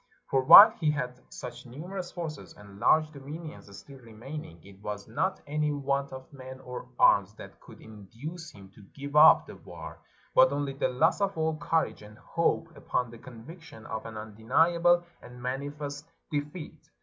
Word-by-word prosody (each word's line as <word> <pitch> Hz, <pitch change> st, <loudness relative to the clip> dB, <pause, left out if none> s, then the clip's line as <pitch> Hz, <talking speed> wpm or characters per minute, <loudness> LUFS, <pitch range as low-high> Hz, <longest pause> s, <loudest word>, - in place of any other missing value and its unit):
For 135 Hz, -, +3 dB
while 205 Hz, -, +11 dB
he 160 Hz, -3 st, -1 dB
had 125 Hz, -4 st, -3 dB
such -, -, -9 dB
numerous 175 Hz, +8 st, -7 dB
forces 160 Hz, -4 st, -7 dB
and 100 Hz, -1 st, -14 dB
large 155 Hz, +5 st, +3 dB
dominions 145 Hz, -7 st, -10 dB
still 135 Hz, -1 st, -13 dB
remaining, 115 Hz, -, -10 dB
it 100 Hz, 0 st, -16 dB
was 105 Hz, -1 st, -6 dB
not 185 Hz, +12 st, -2 dB
any 150 Hz, +1 st, -1 dB
want 140 Hz, -1 st, -2 dB
of 130 Hz, +2 st, -11 dB
men 130 Hz, -1 st, -10 dB
or 125 Hz, 0 st, -8 dB
arms 100 Hz, +1 st, +4 dB
that -, -, -12 dB
could -, -, -15 dB
induce 115 Hz, -, -10 dB
him 95 Hz, -2 st, -15 dB
to 105 Hz, -, -17 dB
give 140 Hz, +1 st, -7 dB
up 155 Hz, +1 st, +8 dB
the -, -, -11 dB
war, -, -, -11 dB, 0.3 s
but 130 Hz, 0 st, +6 dB
only 140 Hz, -1 st, -2 dB
the 135 Hz, -, 0 dB
loss 155 Hz, +10 st, +1 dB
of 195 Hz, -3 st, -1 dB
all 160 Hz, 0 st, 0 dB
courage 165 Hz, 0 st, -1 dB
and 105 Hz, 0 st, -14 dB
hope 165 Hz, +2 st, -1 dB
upon 125 Hz, -3 st, -2 dB
the 120 Hz, -, -12 dB
conviction 130 Hz, +1 st, -13 dB
of 110 Hz, 0 st, -6 dB
an 110 Hz, -1 st, -8 dB
undeniable 165 Hz, +12 st, +2 dB, 0.2 s
and 125 Hz, 0 st, -13 dB
manifest 145 Hz, +3 st, -5 dB, 0.2 s
defeat. 150 Hz, +2 st, -6 dB
140 Hz, 170 wpm, -28 LUFS, 115-160 Hz, 0.3 s, while